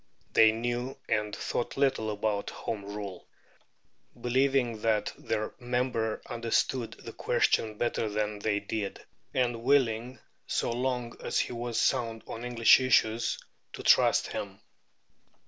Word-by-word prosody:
They 110 -1 +7
knew 120 +3 -3
and 105 -1 0
thought 120 - -3
little 135 -5 +2
about 105 -1 -1
Home 105 -3 -5
Rule, 100 -2 -7 0.9
believing 125 -2 +1
that 110 -2 +1
their 110 0 -3
member 120 -3 -1
understood 115 +1 -1
that - - -11
question 110 -1 +1
better 115 -1 0
than 105 0 -2
they 105 -1 0
did, 100 0 -4 0.3
and 120 -3 0
willing, 125 -2 +2 0.3
so - - 0
long 125 -1 -2
as - - -1
he - - -1
was 120 -1 -2
sound 115 -4 +1
on 115 - -7
English 120 0 +6
issues, 115 -3 +2 0.4
to - - -7
trust - - +5
him. - - -5
115 Hz, 130 wpm, -29 LUFS, 110-125 Hz, 0.9 s, They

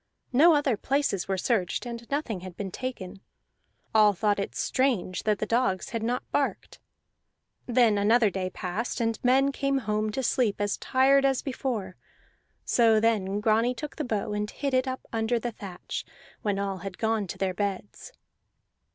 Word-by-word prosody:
No 315 +6 +6
other 280 -6 +1
places 270 -9 0
were 195 -1 -1
searched, 190 +1 0
and 235 -1 -7
nothing 280 -9 -2
had 180 -1 -10
been 195 -2 -4
taken; 195 -6 -6 0.7
all 210 -1 +6
thought 205 +1 +1
it 200 - -4
strange 240 -9 0
that 210 -1 +2
the 215 - -2
dogs 230 -4 0
had 230 - -3
not 240 +3 -1
barked. - - -2 0.9
Then 235 -4 +4
another 215 +1 +4
day 185 -1 -2
passed, 185 +8 -4
and 230 -1 -1
men 265 +2 +4
came 275 0 0
home 215 -3 -1
to 265 - -2
sleep 235 -4 +1
as 205 -1 0
tired 275 +1 +3
as 270 -2 +2
before; 235 -8 -3 0.7
so 225 -2 +4
then 205 -3 +1
Grani 225 +3 +2
took 295 +5 -7
the 305 - -2
bow 215 -5 -2
and 210 0 -2
hid 280 +3 -3
it 255 +1 +2
up 260 0 -3
under 225 +1 +1
the 240 +1 -3
thatch, 195 -4 -6 0.4
when 205 -3 -1
all 195 -1 -2
had 195 0 -7
gone 220 -3 0
to - - -6
their 190 -1 -1
beds. 200 - -4
220 Hz, 170 wpm, -27 LUFS, 200-255 Hz, 0.9 s, No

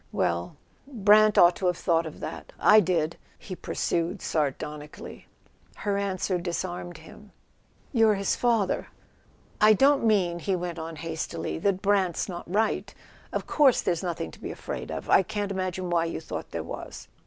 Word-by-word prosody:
"Well—Brant 210 - +1
ought 175 0 +7
to 185 - -1
have 180 -1 +1
thought 165 -1 +1
of 155 - -10
that - - -7
—I 215 - +7
did," 170 -5 0 0.2
he 185 - -8
pursued 170 -1 -2
sardonically. 150 0 -4 0.5
Her 205 -1 -2
answer 190 -2 -1
disarmed 175 0 -4
him. - - -15 0.6
"You're 225 -3 +4
his 195 0 0
father." 230 -6 +1 0.7
"I 215 +1 +8
don't 275 +5 +4
mean," 190 -6 +2
he 190 +2 -1
went 175 -1 -4
on 160 0 -6
hastily, 160 0 -4
"that 195 +1 0
Brant's 195 -3 +1
not 175 -2 -7
right: 215 +3 0 0.4
of - - -3
course 280 -5 +4
there's 170 -2 0
nothing 170 - -4
to - - -15
be - - -5
afraid - - -6
of. - - -5
I - - +6
can't 205 +1 -3
imagine 185 -1 -3
why 170 -1 +2
you 165 - -4
thought 160 - -6
there - - -4
was." - - -8
180 Hz, 160 wpm, -27 LUFS, 170-205 Hz, 0.7 s, I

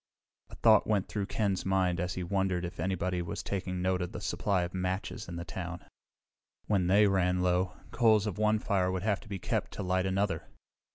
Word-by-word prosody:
A - - -10
thought 110 -2 +5
went 105 -3 +1
through 100 -2 -3
Ken's 100 -4 0
mind 95 -2 +1
and 90 0 -1
he 90 -1 -3
wondered 95 -1 0
if 85 - -7
anybody 90 0 -1
was 85 - -4
taking 90 -2 -3
note 95 0 +1
of 90 - -4
the - - -4
supply 95 -3 0
of 85 - -5
matches 95 +1 -3
in 85 - -5
town. 90 -1 -6 0.8
When 95 -4 +1
they 100 +3 +5
ran 90 -2 +2
low, 90 +1 +1 0.2
coals 110 -3 +4
of 105 -1 -3
one 110 0 +3
fire 95 -3 +1
would 95 0 -2
have 105 -2 +1
to - - -15
be 100 - -3
kept - - -2
to 105 - -4
light 95 +1 +1
another. 95 +1 -1
95 Hz, 205 wpm, -30 LUFS, 90-100 Hz, 0.8 s, thought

